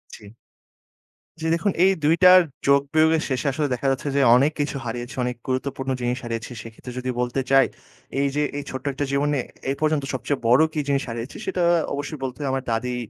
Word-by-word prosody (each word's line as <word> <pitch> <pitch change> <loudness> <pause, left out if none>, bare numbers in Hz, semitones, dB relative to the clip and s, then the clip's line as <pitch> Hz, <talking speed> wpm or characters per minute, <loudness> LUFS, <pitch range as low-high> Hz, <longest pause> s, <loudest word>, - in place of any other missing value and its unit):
জ্বি। 105 -2 -14 1.1
জ্বি। 160 - -2
দেখুন 180 +4 0
এই 190 - +5
২ 155 +3 +4
টার 185 0 +9 0.3
যোগ-বিয়োগের 155 +3 +3
শেষে 130 +2 -1
আসলে 145 +2 -1
দেখা 125 +2 -2
যাচ্ছে 135 +2 -3
যে 140 - +3
অনেক 140 +5 +4
কিছু 145 -1 -1
হারিয়েছি, 120 +1 -5
অনেক 125 0 -2
গুরুত্বপূর্ণ 135 +1 -2
জিনিস 120 +1 -1
হারিয়েছি। 115 0 -5
সেক্ষেত্রে 115 +2 -10
যদি 130 0 -4
বলতে 125 +2 0
চাই 135 -1 +6 0.5
এই 140 - +2
যে 150 - +1 0.2
এই 145 - -4
ছোট্ট 130 +1 -6
একটা 145 +2 -2
জীবনে 145 +1 +1 0.3
এ - - +1
পর্যন্ত 155 -2 +1
সবচেয়ে 130 +2 -2
বড় 125 +5 +6
কি 155 - -1
জিনিস 140 -1 +1
হারিয়েছি 115 +2 -6
সেটা 180 - -1 0.3
অবশ্যই 145 +1 -5
বলতে 130 -1 -4
হবে 140 -2 -2
আমার 135 -1 -2
দাদী 125 +2 -1
135 Hz, 190 wpm, -23 LUFS, 125-145 Hz, 1.1 s, টার